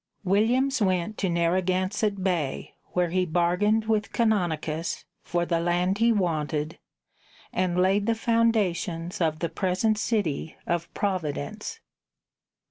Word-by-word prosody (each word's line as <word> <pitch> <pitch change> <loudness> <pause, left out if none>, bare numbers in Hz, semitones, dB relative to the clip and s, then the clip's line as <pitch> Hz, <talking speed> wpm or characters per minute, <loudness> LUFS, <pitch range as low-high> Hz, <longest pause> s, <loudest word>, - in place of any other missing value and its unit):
Williams 235 +8 +2
went 185 +1 0
to 190 - 0
Narragansett 185 +4 0
Bay, 170 -8 -1 0.2
where 180 -1 +1
he 185 +1 +2
bargained 180 +6 +2
with 215 -2 0
Canonicus 170 -8 0 0.2
for 175 -1 -1
the 170 -1 +1
land 175 +3 +1
he 230 +1 +4
wanted, 155 -6 -1 0.7
and 180 -1 0
laid 195 +3 +3
the 230 - +2
foundations 205 -6 0
of 160 -2 +1
the 170 - -1
present 200 +3 0
city 175 -10 -1
of 170 0 -2
Providence. 190 - -3
185 Hz, 120 wpm, -26 LUFS, 170-210 Hz, 0.7 s, he